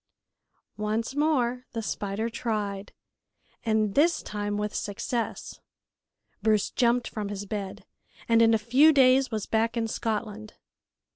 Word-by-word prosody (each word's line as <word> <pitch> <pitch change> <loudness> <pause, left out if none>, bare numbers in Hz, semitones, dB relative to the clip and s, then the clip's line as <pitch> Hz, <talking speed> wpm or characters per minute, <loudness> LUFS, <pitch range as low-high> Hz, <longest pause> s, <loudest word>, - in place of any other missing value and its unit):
Once 215 +4 -1
more 255 -5 0
the 230 - -2
spider 205 +1 -3
tried, 210 -4 -3 0.7
and 215 -2 +1
this 335 - +3
time 205 0 -3
with 210 0 -2
success. 225 +3 -4 0.8
Bruce 215 -2 +2
jumped 240 0 +2
from 210 -2 -5
his 205 0 -5
bed, 200 -2 -5 0.4
and 230 -1 +4
in 225 0 +5
a - - +4
few 255 +8 +5
days 265 -2 +4
was 215 -3 -3
back 225 +1 0
in 225 -1 0
Scotland. 215 -1 -4
225 Hz, 130 wpm, -27 LUFS, 210-240 Hz, 0.8 s, in